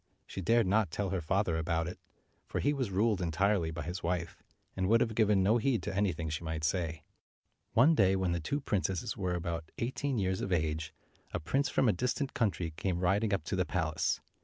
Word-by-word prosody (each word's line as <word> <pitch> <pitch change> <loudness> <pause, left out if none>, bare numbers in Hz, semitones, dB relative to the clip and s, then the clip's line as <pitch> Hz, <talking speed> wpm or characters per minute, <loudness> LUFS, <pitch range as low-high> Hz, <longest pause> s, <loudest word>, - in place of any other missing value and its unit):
She 95 - -6
dared 115 +4 +3
not 100 0 +2
tell 100 +3 -2
her 95 -2 -1
father 90 0 +1
about 80 0 0
it, 90 - -7 0.5
for - - -2
he 145 - +2
was 130 -6 -1
ruled 100 0 +1
entirely 90 +1 +1
by 80 +1 -5
his 90 +3 -5
wife, 85 -1 -2 0.3
and 95 0 0
would 115 +1 +5
have 115 -1 +1
given 105 -3 +3
no 110 +5 +4
heed 120 -1 +1
to - - -3
anything 90 -5 0
she 80 +2 -3
might 80 -1 -3
say. 80 -1 -1 0.7
One 135 +8 +6
day, 95 -8 +4
when 95 -2 0
the 85 - 0
two 140 - -2
princesses 100 -2 -1
were 90 -2 -1
about 85 -2 -3
213 - - 0
eighteen 135 0 -2
years 95 -2 0
of 95 - -3
age, 80 -2 0 0.4
a - - 0
prince 135 - 0
from 130 - +2
a 110 - +4
distant 125 +8 -1
country 95 -7 0
came 90 -1 -1
riding 100 +4 +2
up 100 -6 0
to 80 - -2
the 90 - +2
palace. 80 -4 0
95 Hz, 215 wpm, -32 LUFS, 85-110 Hz, 0.7 s, One